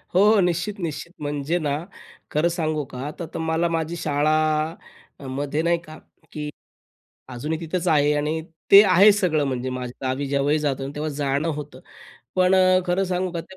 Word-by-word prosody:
हो, 210 +3 +5
निश्चित, 180 +3 0
निश्चित 170 0 -5
म्हणजे 145 +3 -1
ना, 145 -3 -1 0.5
खरं 155 +3 +2
सांगू 155 -3 -1
का 130 +3 -4
त - - -5
तर - - -4
मला 160 +1 0
माझी 165 0 -2
शाळामध्ये 155 -2 -1
नाही 170 +1 +2
का 155 0 -11
की - - -21 1.3
अजूनही 150 +6 -3
तिथंच 170 +2 -3
आहे 150 -2 +4
आणि 150 +2 -1 0.3
ते 200 +1 +11
आहे 195 +2 +7
सगळं 175 -7 +1
म्हणजे 130 -1 -2
माझ्या 125 +1 -6
गावी 135 +2 -2
जेव्हाही 140 +2 +1
जातो, 135 -2 -2
तेव्हा 150 +1 -3
जाणं 140 +2 -1
होतं. 150 -2 -6 0.6
पण 185 0 +4
अ, 185 0 +5
खरं 180 +2 +1
सांगू 185 0 -1
का 170 - -3
त्या 190 +3 -14
155 Hz, 165 wpm, -23 LUFS, 145-175 Hz, 1.3 s, ते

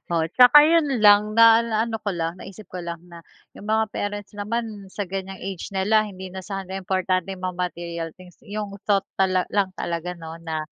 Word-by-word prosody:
Oo 165 -1 +1
'tsaka 255 +4 +8
yun 325 -1 +3 0.2
lang 210 +1 +6
na 230 0 +8
naano 225 -1 -1
ko 210 - -4
lang 165 +1 -3
naisip 195 +2 -10
ko 180 - -5
lang 170 0 -5 0.2
na 170 - -10 0.3
yung 205 - -11
mga 220 -1 +1
parents 205 0 -4
naman 210 -1 -4
sa 205 +2 -4
ganiyang 190 +1 -5
age 190 -2 -6
nila 200 +3 +2
hindi 185 -1 -9
na 190 - -6
sana 195 -1 -6
importanteng 185 0 -1
mga 185 -1 -3
material 170 -2 -4
things, 180 -1 -16
yung 210 -1 -6 0.2
thought 200 -2 +3 0.2
tala 185 -1 +2
lang 200 -2 +2
talaga 175 +1 -4
no 165 0 -9
na, 160 -2 -4
195 Hz, 190 wpm, -23 LUFS, 180-215 Hz, 0.3 s, tsaka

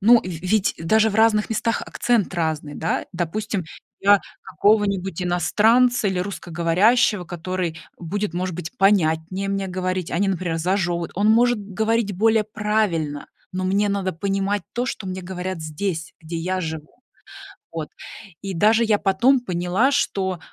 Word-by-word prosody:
ну, 235 +3 +6
в - - -19
ведь 185 +4 0
даже 220 +7 +3
в - - -6
разных 220 -1 +3
местах 225 +1 0
акцент 235 -6 0
разный, 155 -3 -2
да. 165 - -2
Допустим, 185 +2 -2 0.4
я 200 0 +5 0.2
какого-нибудь 200 -4 +1
иностранца 220 +6 +3
или 190 -1 -1
русскоговорящего, 180 +3 +1
который 175 -1 -4 0.2
будет, 195 +2 -3
может 180 0 -2
быть, 165 -1 -7
понятнее 185 -1 +2
мне 195 -1 -2
говорить, 185 -1 -2
а - - -1
не, 200 - +2
например, 175 -3 -1
зажёвывать. 175 -1 -1
Он 205 +3 +2
может 240 +1 +4
говорить 215 +2 -1
более 220 +1 +3
правильно, 210 -9 -1 0.3
но 185 0 -3
мне 200 +2 +2
надо 195 -2 -1
понимать 195 +3 -1
то, 245 +1 -1
что 220 -7 -4
мне 185 0 -5
говорят 180 -1 -5
здесь, 160 +1 -4
где 165 +1 -6
я 185 +3 -2
живу. 160 -3 -6 0.8
Вот. - - -4 0.5
И 195 -1 -5
даже 220 +6 +4
я 215 -2 +2
потом 235 +8 +3
поняла, 185 +4 +1
что 190 -10 0
190 Hz, 150 wpm, -22 LUFS, 175-210 Hz, 0.8 s, ну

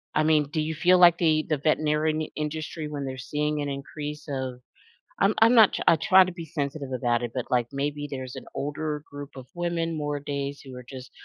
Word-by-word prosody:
I 155 - +3
mean, 155 -2 +3
do 155 - -1
you 160 +1 -2
feel 180 +4 +4
like 175 -1 +7
the 155 -2 +2
the 155 - +1
veterinarian 155 +1 +1
n - - -5
industry, 155 +1 -4
when 145 -2 -4
they're 130 0 -5
seeing 150 +3 -2
an 145 - -2
increase 150 +2 -6
of 130 -3 -4 0.6
I'm 200 +2 +4
I'm 230 +2 +6
not 220 -4 +6
I 165 - +6
try 185 +4 +6
to 185 - -5
be 170 -2 -7
sensitive 140 -3 -4
about 120 -1 0
it, 120 - -3
but, 125 - -4
like, 120 -2 +1
maybe 145 +1 -2
there's 130 -2 -6
an - - -8
older 150 +1 -3
group 145 0 -8
of 130 -1 -9
women 170 -2 -2
more 145 -1 -2
days, 140 0 -4
who 130 -2 -11
are 125 - -9
just 130 -2 -9
150 Hz, 220 wpm, -26 LUFS, 140-160 Hz, 0.6 s, like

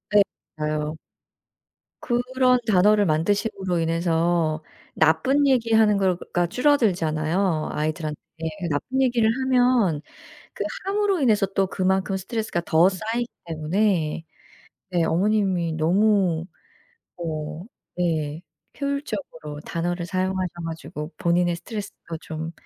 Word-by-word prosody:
예. 205 - +9 0.4
맞아요. 150 0 -2 1.0
그런 250 +1 +2
단어를 205 +1 +5
만드심으로 185 +2 0
인해서 165 -1 +1 0.3
나쁜 270 - +3
얘기 235 -4 +2
하는 215 -2 +5
거가 180 -2 0
줄어들잖아요. 175 - +1
아이들한테 155 0 -2 0.5
나쁜 255 - -1
얘기를 240 -4 +3
하면 245 - +3 0.5
그 - - -3 0.2
함으로 400 -2 +1
인해서 215 -7 +3
또 195 0 0
그만큼 190 0 0
스트레스가 215 -2 -3
더 165 +3 +5
쌓이기 225 +5 -2 0.2
때문에 165 0 0 0.7
네 175 -2 +1
어머님이 185 -1 +1
너무 175 +1 +2 0.7
어 155 0 -5 0.3
네 160 -2 -1 0.4
효율적으로 280 - -4
단어를 175 +1 -2
사용하셔 185 0 -1 0.2
가지고 160 -1 -6
본인의 175 -1 +1
스트레스가 200 -4 -7
좀 160 +1 -6
180 Hz, 260 characters per minute, -24 LUFS, 160-220 Hz, 1.0 s, 예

